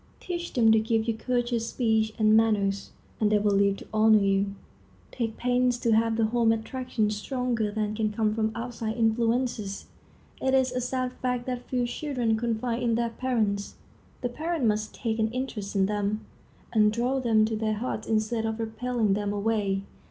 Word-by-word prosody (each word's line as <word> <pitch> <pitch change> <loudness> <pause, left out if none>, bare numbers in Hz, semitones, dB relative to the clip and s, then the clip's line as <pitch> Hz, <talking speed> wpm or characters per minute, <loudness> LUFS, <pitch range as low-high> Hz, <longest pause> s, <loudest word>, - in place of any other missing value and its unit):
Teach 345 -1 -5
them 225 -4 +5
to 220 - +5
give 225 0 0
you 230 - +2
courteous 240 -1 -1
speech 220 -3 +1
and 215 -1 +4
manners, 205 -3 +2 0.3
and 215 -1 +2
they 210 - +5
will 205 0 +2
live 200 0 +3
to - - -11
honor 220 0 +6
you. 195 0 +1 0.6
Take 225 -2 -3
pains 250 0 +2
to 235 -1 0
have 225 0 +2
the 225 - +3
home 230 0 +2
attractions 225 -1 -1
stronger 240 -1 -1
than 215 0 -2
can 215 -1 0
come 215 0 0
from 220 0 0
outside 230 -1 -4
influences. 230 -2 0 0.6
It 265 0 +2
is 260 -1 +3
a 250 0 -2
sad 255 0 -2
fact 250 -1 -1
that 250 -1 -5
few 250 -1 +1
children 245 -3 -1
confide 230 +1 -1
in 235 -2 +1
their 235 0 0
parents. 220 -5 -1 0.5
The 245 - -1
parents 315 0 -1
must 215 0 -1
take 225 -1 -2
an 220 0 +2
interest 240 -6 -4
in 195 -1 +3
them, 205 +1 -1 0.5
and 210 -2 +5
draw 245 +4 0
them 225 -4 +3
to 220 0 -2
their 215 0 0
hearts 240 +5 -4
instead 220 +1 0
of 220 0 -3
repelling 225 -1 0
them 205 0 -1
away. 205 -2 0
225 Hz, 180 wpm, -27 LUFS, 215-245 Hz, 0.6 s, honor